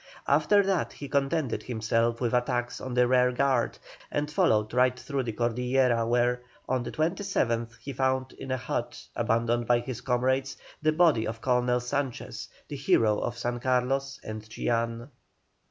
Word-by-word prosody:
After 205 -1 +4
that 190 -4 0
he 140 - -7
contented 140 -1 0
himself 115 0 0
with 120 -2 -1
attacks 125 0 0
on 130 -1 -5
the 125 0 +4
rear 125 0 +4
guard, 130 -2 +1 0.3
and 150 +1 -2
followed 110 -7 +2
right 125 0 +3
through 140 +1 -2
the 120 -3 -3
Cordillera, 120 +1 +1
where, 120 +1 +2 0.3
on 130 -1 +1
the 120 - -5
27th, 155 - -1
he 140 - -7
found 130 0 0
in 135 - -9
a 130 - 0
hut, 125 - -4
abandoned 115 +1 +1
by 120 - +5
his 120 0 -5
comrades, 130 +2 0 0.2
the 155 0 +3
body 155 -9 +3
of 115 +1 -5
Colonel 125 0 +2
Sanchez, 130 +1 -4 0.2
the 145 - -6
hero 110 -6 +3
of 120 - -3
San 120 0 -2
Carlos 130 +2 0
and 110 0 -6
Chillán. 115 +2 -2
125 Hz, 160 wpm, -28 LUFS, 120-135 Hz, 0.3 s, by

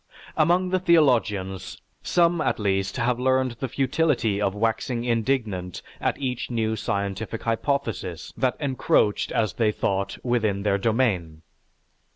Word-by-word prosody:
"_) - - -44 0.3
Among 175 +4 +3
the 185 0 +1
theologians, 120 - +1 0.2
some 170 -1 +2
at - - 0
least 95 -2 -1
have 120 +1 0
learned 130 0 +2
the 135 - -2
futility 130 -5 +1
of 100 -1 0
waxing 115 +2 -1
indignant 115 -6 -1 0.2
at - - 0
each 125 -3 -3
new 110 -2 0
scientific 100 +2 -3
hypothesis 115 - -2
that 125 +1 0
encroached, 130 -6 +1
as 110 -3 0
they 110 -2 +2
thought, 100 -1 -2
within 110 -5 0
their 100 -1 +1
domain. 95 -9 0
115 Hz, 135 wpm, -25 LUFS, 100-130 Hz, 0.3 s, Among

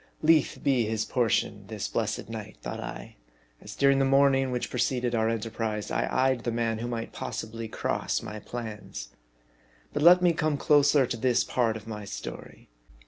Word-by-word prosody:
Lethe 155 -2 +3
be 130 -4 +3
his 110 0 -1
portion 120 -3 0
this - - -4
blessed - - -2
night, 110 -2 -7
thought - - -5
I, - - -8 0.4
as - - -9
during 140 0 +4
the - - +3
morning 135 -1 +4
which 125 -1 -3
preceded 125 0 0
our 110 -1 +2
enterprise, 110 -1 -3
I - - 0
eyed 130 -2 +2
the 120 - -1
man 115 -1 -1
who 120 - -3
might 115 -1 -4
possibly 115 +1 -5
cross - - -2
my 105 0 -6
plans. 105 - -7 0.8
But 145 - -1
let 180 +3 +7
me 175 -1 +5
come 155 -2 0
closer 145 -1 +4
to 120 -1 -4
this 125 0 +2
part 115 -3 0
of 110 - -12
my 105 -2 -6
story. - - -8
120 Hz, 175 wpm, -28 LUFS, 110-135 Hz, 0.8 s, let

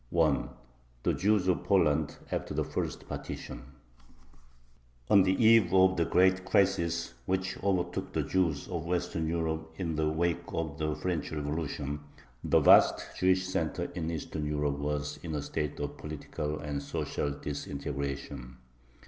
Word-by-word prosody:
THE - - +2
JEWS 100 -1 +2
OF 90 -1 +2
POLAND 80 -5 +2 0.2
AFTER - - -3
THE - - +1
FIRST - - -4
PARTITION - - -6 1.5
On 100 - +8
the 95 0 +3
eve 110 -6 +6
of 95 0 +6
the 85 - +2
great 95 +1 +3
crisis 85 -4 +1
which 95 0 0
overtook 95 -3 0
the - - 0
Jews 85 -6 0
of 85 -3 -4
Western 90 -2 -1
Europe 80 -1 -2
in 85 -3 -2
the 80 -1 +2
wake 85 +2 0
of 80 -2 -4
the 75 -1 0
French 90 -3 -2
Revolution, 75 -1 -3 0.4
the - - +4
vast - - +5
Jewish 95 0 +3
center 80 -4 -2
in 85 -2 -3
Eastern 80 -2 -4
Europe 75 -1 -1
was 75 0 -2
in 80 -3 -4
a 75 - -1
state 75 0 -3
of 75 0 -4
political 75 0 -4
and 75 -2 -3
social 70 +1 -2
disintegration. 70 -3 -5
80 Hz, 140 wpm, -30 LUFS, 75-90 Hz, 1.5 s, On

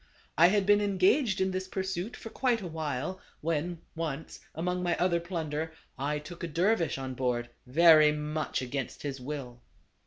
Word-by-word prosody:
I 170 - +7
had 200 +1 +2
been 205 +1 +5
engaged 200 +3 +3
in 190 0 +1
this 185 0 -3
pursuit 190 +2 -3
for 225 - -9
quite 250 -3 +1
a 195 - -7
while, 160 +2 -3 0.2
when, 165 +2 -2
once, 160 -2 -4 0.2
among 180 +2 -1
my 175 -1 +1
other 175 -1 +2
plunder, 160 -2 -3 0.2
I 145 +3 -1
took 170 +4 -9
a - - -1
dervis 170 +1 +1
on 130 -1 -4
board, 125 -2 -1 0.2
very 155 +2 +7
much 150 -2 -2
against 130 +1 -4
his 140 -3 -4
will. 125 -3 -6
165 Hz, 165 wpm, -30 LUFS, 150-185 Hz, 0.2 s, I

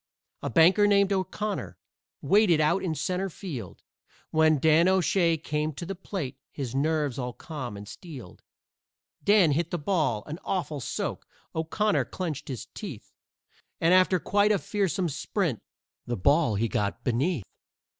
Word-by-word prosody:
A - - -2
banker 180 - +5
named 200 -1 +4
O'Connor 195 +2 -3 0.5
waited 195 -6 +4
out 155 +5 +2
in 165 -4 -2
centre 185 +6 -1
field 140 - -7 0.5
When 155 -1 +4
Dan 160 +4 +4
O'Shay 180 -2 +3
came 150 0 -2
to 170 - -6
the 195 - -4
plate, 175 -8 -5
his 130 -4 -5
nerves 145 -1 0
all 125 -1 -3
calm 130 -10 -7
and 100 0 -9
steeled. 135 - -10 0.8
Dan 200 -6 +5
hit 165 +3 0
the 175 - -2
ball 150 - 0
an 155 +3 -6
awful 170 -6 -2
soak, - - -4 0.3
O'Connor 200 +7 0
clenched 155 -6 -5
his 130 -4 -5
teeth, 165 - -8 0.7
And 165 +2 +4
after 185 0 +5
quite 205 +4 +2
a 210 - +4
fearsome 195 -2 -1
sprint, 160 - -2 0.5
the 120 - -2
ball 140 - +3
he 115 +3 +1
got 100 -2 -2
beneath. 130 - 0
160 Hz, 145 wpm, -27 LUFS, 140-185 Hz, 0.8 s, banker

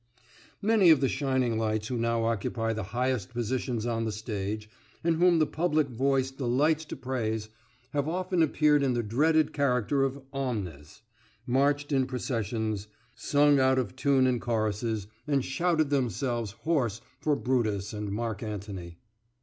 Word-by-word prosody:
Many 210 -4 +5
of 155 -4 +7
the 135 - +2
shining 130 -5 0
lights 110 -1 -1
who 125 - -2
now 115 -1 0
occupy 115 0 -1
the 110 -3 -4
highest 125 -3 -1
positions 120 -1 -2
on 115 -1 -1
the 110 - -1
stage, 105 0 -4 0.4
and 165 -1 +2
whom 175 0 +5
the 155 - +4
public 155 -2 0
voice 130 +2 +1
delights 140 +5 +1
to - - -6
praise, 110 -4 -3 0.4
have 145 -1 -1
often 180 +1 0
appeared 150 -1 +3
in 135 -2 +2
the 120 - 0
dreaded 155 +8 +2
character 135 -1 +1
of 135 +1 -1
omnes, 100 - -4 0.4
marched 145 +3 +1
in 135 -2 +2
processions, 110 -4 -2 0.3
sung 145 +3 +3
out 130 0 +4
of 120 -7 -1
tune 135 -2 +3
in 125 -2 +2
choruses, 110 -2 -1 0.2
and 140 -3 +1
shouted 155 +1 +1
themselves 120 -3 0
hoarse 125 -10 0 0.2
for 150 -1 +1
Brutus 110 -7 -1
and 105 -1 -4
Mark 110 0 -3
Antony. 100 -5 -6
125 Hz, 150 wpm, -28 LUFS, 110-140 Hz, 0.4 s, of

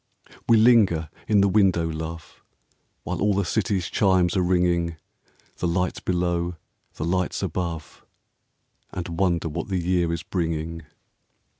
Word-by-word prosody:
We 115 - +7
linger 105 -9 +4 0.2
in 105 -2 +4
the 100 - +4
window, 95 -4 +3
love, 80 +1 -7 0.6
While - - -4
all 100 0 +2
the 100 -1 +1
city's 95 -3 0
chimes 95 -3 +2
are 95 - +2
ringing, 90 -2 +1 0.3
— - - -35
The 90 - 0
lights 90 +2 -1
below, 85 -1 -1 0.4
the 75 - -3
lights 90 +1 -1
above, 85 -3 -4 0.4
— - - -45
And 85 -1 -5
wonder 85 -4 +1
what 75 - -4
the 95 -2 -1
year 90 -1 +1
is 85 -1 -3
bringing. 80 -2 -3
90 Hz, 145 wpm, -24 LUFS, 85-95 Hz, 0.6 s, We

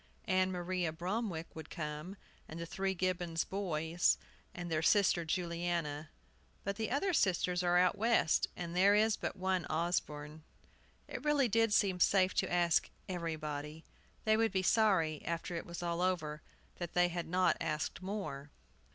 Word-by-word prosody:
Ann 185 -1 +2
Maria 180 -1 -1
Bromwick 180 0 -3
would 160 -1 -8
come, 155 +4 -5 0.3
and 160 - -7
the 170 - -4
three 190 +3 -2
Gibbons 175 -2 -1
boys, 170 -3 +1 0.3
and 175 -1 -6
their 155 -1 +1
sister 185 0 +4
Juliana; 170 -3 -2 0.5
but 200 0 -2
the 220 +1 -2
other 355 +9 0
sisters 180 - +2
are 175 0 +3
out 180 +1 +4
West, 225 -7 +3
and 170 -1 -5
there 195 +3 +5
is 215 0 +4
but - - -4
one 185 -2 -1
Osborne." 155 -2 -2 0.7
It - - -6
really 295 -3 +3
did 225 0 +2
seem 195 -3 +3
safe 185 0 +4
to - - +1
ask 175 -1 +3 0.2
"everybody." 155 -3 -4 0.4
They 215 0 +4
would 225 0 +2
be 190 -2 0
sorry, 185 -8 +3
after 170 +1 -3
it 165 - -5
was 170 0 -6
over, 170 -3 -1 0.4
that 175 -2 -5
they 175 0 +4
had 175 0 -4
not 180 +2 +3
asked 155 +3 -2
more. 185 -8 -5
175 Hz, 155 wpm, -34 LUFS, 165-190 Hz, 0.7 s, there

